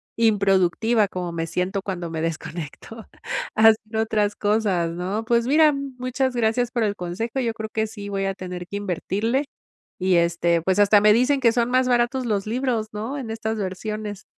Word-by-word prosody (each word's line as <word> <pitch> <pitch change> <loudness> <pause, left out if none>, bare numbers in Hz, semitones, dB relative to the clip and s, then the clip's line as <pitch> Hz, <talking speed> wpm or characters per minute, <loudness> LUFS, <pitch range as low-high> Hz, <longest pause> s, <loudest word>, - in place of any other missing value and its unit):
improductiva, 205 0 +2
como 180 -2 -4
me 165 -1 -2
siento 180 +4 -2
cuando 180 -4 -4
me 160 -1 -4
desconecto, 165 +6 -6 0.5
haciendo 220 0 +4
otras 210 -2 0
cosas, 205 -5 +1
¿no? 185 +6 -3
Pues 235 0 +2
mira, 300 +3 +5
muchas 260 -1 -2
gracias 240 +1 +1
por 235 - 0
el 205 -1 0
consejo, 210 +9 -3
yo 230 -2 -1
creo 220 -1 -5
que 220 0 -1
sí 205 -2 -8
voy 195 -1 -2
a 195 - -1
tener 180 -1 -7
que 200 - -5
invertirle, 205 - -1 0.6
y 185 -1 +3
este, 170 0 +2
pues, 190 +3 +1
hasta 205 0 +6
me 210 0 +6
dicen 255 +5 +3
que 240 -3 +4
son 240 0 +1
más 255 0 +3
baratos 245 +1 +1
los 205 -3 0
libros, 235 -2 -1
¿no? 225 +7 -4
En 245 -5 -6
estas 220 0 -3
versiones. 210 +1 -5
215 Hz, 180 wpm, -23 LUFS, 185-235 Hz, 0.6 s, hasta